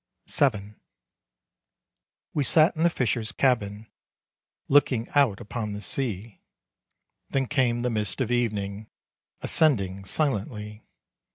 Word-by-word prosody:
VII. 105 -7 +1 1.6
We 145 - +1
sat 155 +5 +4
in 160 - -4
the 170 - +5
fisher's 115 -6 -1
cabin, 110 -5 0 0.8
Looking 135 -4 +3
out 135 -9 +2
upon 105 0 -5
the 105 - -6
sea. 110 -2 -1 0.9
Then 135 -1 0
came 125 -4 +1
the 125 0 -1
mists 105 -3 -2
of 125 -3 -1
evening, 105 -3 -2 0.5
Ascending 100 - +1
silently. 105 - -2
115 Hz, 105 wpm, -26 LUFS, 105-135 Hz, 1.6 s, the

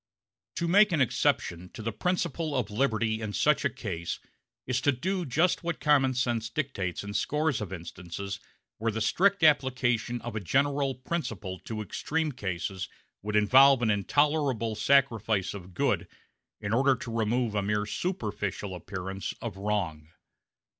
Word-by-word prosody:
To 170 - -1
make 205 +4 +6
an 165 - +1
exception 90 -8 +1
to 110 - -8
the 115 - -1
principle 165 - -1
of 120 -6 -1
liberty 110 -2 +1
in 105 -1 -4
such 150 +6 +3
a 140 - +2
case 85 -9 -4 0.5
is 125 0 0
to 145 - +4
do 180 +6 -2
just 165 +9 +2
what 170 0 -2
common 135 -4 +3
sense 120 -3 0
dictates 110 - -3
in 100 0 -6
scores 150 0 0
of 100 -4 -5
instances 90 +3 -6 0.4
where 115 +1 0
the 110 - -3
strict 195 - +2
application 125 -5 +2
of 120 -1 -6
a - - 0
general 140 +6 +1
principle 115 - -4
to 110 -1 -4
extreme 155 - -2
cases 95 -4 -4 0.3
would 105 +1 -3
involve 130 +5 +6
an 110 - +3
intolerable 135 +1 +1
sacrifice 110 -5 +2
of 95 -2 -10
good - - +1 0.5
in 100 +1 -3
order 135 +2 +4
to 115 -1 -6
remove 115 +1 +1
a 105 - +1
mere 105 +1 0
superficial 105 - -3
appearance 95 +2 -5
of 115 -5 -5
wrong. 95 -7 -2
115 Hz, 155 wpm, -28 LUFS, 100-140 Hz, 0.5 s, make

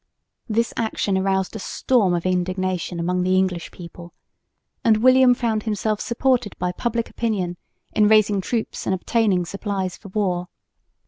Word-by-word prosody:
This 230 +2 0
action 220 -3 -1
aroused 190 +1 0
a - - -4
storm 200 -3 +1
of 170 - -3
indignation 185 -1 -1
among 180 +2 0
the 185 +1 +2
English 185 -2 0
people, 175 0 -12 0.7
and 220 -2 +4
William 255 +2 +5
found 225 -3 -1
himself 210 0 -1
supported 245 -2 0
by 180 - -1
public 235 +4 -2
opinion 195 -7 -2 0.4
in 210 -1 +4
raising 210 -2 +4
troops 225 +3 -3
and 190 - +2
obtaining 190 -2 +1
supplies 195 0 -3
for - - -13
war. 185 -3 -1
195 Hz, 145 wpm, -22 LUFS, 180-225 Hz, 0.7 s, William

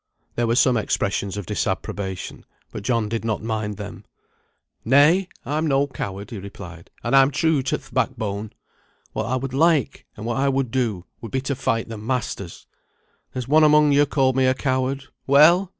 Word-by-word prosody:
There 120 -1 0
were 115 - +2
some 130 -2 +4
expressions 100 -2 -1
of 100 - -5
disapprobation, 95 -2 -3 0.3
but 110 - -6
John 115 0 0
did 115 +1 -3
not 110 -2 -2
mind 110 -2 -3
them. 105 -1 -8 0.8
"Nay! 150 - +5 0.2
I'm 155 +3 -1
no 140 -1 +3
coward," 100 -5 -6
he 110 - -5
replied, 90 -3 -10
"and - - +1
I'm 135 0 +6
true 155 0 +1
to 130 - -1
th' - - -17
backbone. 110 -5 -2 0.6
What 110 - -2
I 130 - 0
would 130 0 -3
like, 155 -2 +2
and 105 - -7
what 120 +1 -1
I 140 +1 +2
would 135 -3 0
do, 115 -9 -1 0.2
would 115 - -8
be 130 - -1
to 140 +1 -2
fight 115 -2 -1
the 115 -2 -7
masters. 110 -6 -4 0.7
There's 125 -2 -4
one 155 +3 +5
among 150 -1 +5
yo 145 +1 +4
called 130 -3 +2
me 130 -1 +3
a 130 - +3
coward. 130 0 -1 0.2
Well! 165 +7 +6
125 Hz, 180 wpm, -23 LUFS, 105-140 Hz, 0.8 s, I'm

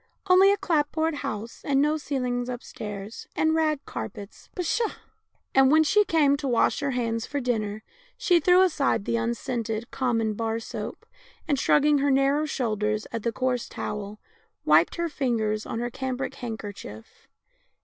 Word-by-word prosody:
Only 380 +1 +6
a 405 - +2
clap 300 -6 +1
board 320 0 0
house, 220 -2 -5
and 275 -1 +2
no 300 +2 +3
ceilings 250 -5 -2
upstairs, 210 -4 -7
and 315 0 +2
rag 310 -3 +1
carpets 195 - -8
— - - -38
pshaw! 410 +6 0 0.3
" - - -47
And 270 0 +6
v/hen 315 +2 +6
she 420 +7 +4
came 295 -5 +3
to 280 - -4
wash 240 -3 +2
her 280 - -1
hands 230 -3 -1
for 285 - -2
dinner, 215 -4 -2 0.3
she 355 -3 +3
threw 360 +3 +5
aside 285 - +1
the 230 - 0
unscented, 235 -1 -3
common 230 -4 0
bar 225 +1 -2
soap, 230 - -7 0.4
and, 285 -4 +1
shrugging 295 +1 +4
her 285 +1 +2
narrow 275 +3 +2
shoulders 215 -5 -1
at 230 - -3
the 235 - -1
coarse 250 +1 -1
towel, 210 0 -5 0.5
wiped 155 +2 +4
her 340 0 -1
fingers 225 -8 -1
on - - -4
her 240 +1 -2
cambric 260 +1 -3
handkerchief. 205 - -8
250 Hz, 165 wpm, -26 LUFS, 220-295 Hz, 0.5 s, Only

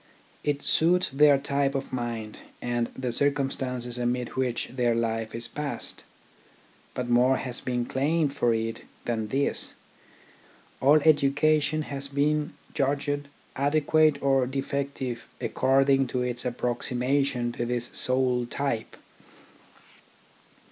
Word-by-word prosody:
It 145 -1 -1
suits 180 +3 +3
their 145 +1 +6
type 140 0 0
of 135 -1 -4
mind 115 -3 -4 0.2
and 120 -1 -1
the 125 -2 -2
circumstances 130 -3 -1
amid 120 0 -1
which 125 -2 -2
their 120 -2 +1
life 115 -1 -1
is 115 0 -4
passed. 150 -1 -5 0.9
But 125 -1 -2
more 125 +2 +4
has 125 -2 -5
been 125 -1 -1
claimed 145 +3 +1
for 120 - +2
it 115 0 -2 0.2
than 110 -2 -1
this. 135 +5 -1 1.1
All 145 +3 +6
education 155 +1 +3
has 140 -1 -5
been 150 +2 0 0.2
judged 145 +1 -1 0.3
adequate 150 +1 +3
or 135 -2 +3
defective 135 -2 -3
according 135 0 +3
to 125 0 -1
its 125 0 -3
approximation 125 +1 0
to 120 - -3
this 120 0 -2
sole 130 -1 +1
type. 130 -3 -3
135 Hz, 115 wpm, -27 LUFS, 120-140 Hz, 1.1 s, their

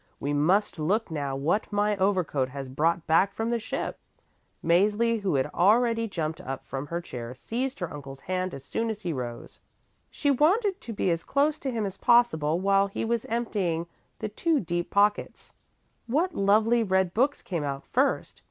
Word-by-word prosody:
We 145 +1 -2
must 175 +6 +2
look 190 +6 0
now 140 -3 -2
what 160 +12 0
my 205 0 +1
overcoat 185 -9 +1
has 135 0 -6
brought 160 +5 0
back 190 +5 +3
from 225 +2 -1
the 235 - +1
ship." 220 - -4 0.7
Mäzli 210 +6 +3
who 190 -6 0
had 130 - +2
already 230 +4 +3
jumped 160 -5 -3
up 135 0 -6
from 135 +1 -5
her 170 +3 -2
chair 125 -6 -7
seized 255 - -3
her 175 - -3
uncle's 135 -2 -9
hand 185 0 -2
as 135 - -10
soon 225 +9 -2
as 215 -1 -4
he 175 -5 -2
rose. 120 -3 -6 0.5
She 285 - 0
wanted 380 - +2
to 235 - -7
be 195 -4 0
as 165 0 -1
close 290 +2 +1
to 270 - -3
him 225 -3 -1
as 195 - -5
possible 180 -10 +3
while 195 +1 +3
he 200 - -3
was 235 0 -1
emptying 200 -8 -1 0.3
the 215 - -4
two 310 +8 +1
deep 175 -3 -2
pockets. 205 +1 +1 0.5
What 320 +9 +1
lovely 220 +2 +3
red 190 -4 +1
books 270 +5 +1
came 170 -5 -3
out 140 -1 -3
first! - - 0
195 Hz, 180 wpm, -27 LUFS, 160-230 Hz, 0.7 s, back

